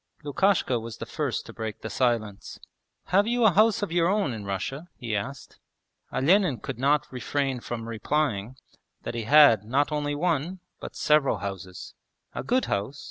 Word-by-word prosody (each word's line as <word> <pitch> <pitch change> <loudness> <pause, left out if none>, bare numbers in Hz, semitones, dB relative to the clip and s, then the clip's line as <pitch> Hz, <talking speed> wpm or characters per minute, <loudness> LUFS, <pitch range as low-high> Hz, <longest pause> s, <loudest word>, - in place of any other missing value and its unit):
Lukashka 145 -4 +1
was 115 0 -8
the - - -6
first - - -3
to - - -10
break 110 -1 -6
the 110 - -5
silence. 115 -5 -1 0.5
'Have 200 +4 +3
you 240 0 +2
a 215 - +7
house 215 +2 +3
of 200 - -3
your 170 0 +2
own 200 - +1
in 105 -3 -7
Russia?' 115 - -4
he 115 -3 -3
asked. 130 +7 -6 0.5
Olenin 175 - +3
could 110 - -6
not 145 +3 +2
refrain 130 +1 -2
from 115 -1 -6
replying 115 -1 -1 0.5
that - - -4
he 115 -2 -4
had 145 -7 +7
not 140 +7 0
only 145 -1 -1
one, 170 +2 -1 0.2
but - - -8
several 150 -2 +3
houses. 95 -2 -7 0.4
'A - - -4
good 255 +1 +2
house? 105 +8 -3
140 Hz, 170 wpm, -26 LUFS, 115-165 Hz, 0.5 s, a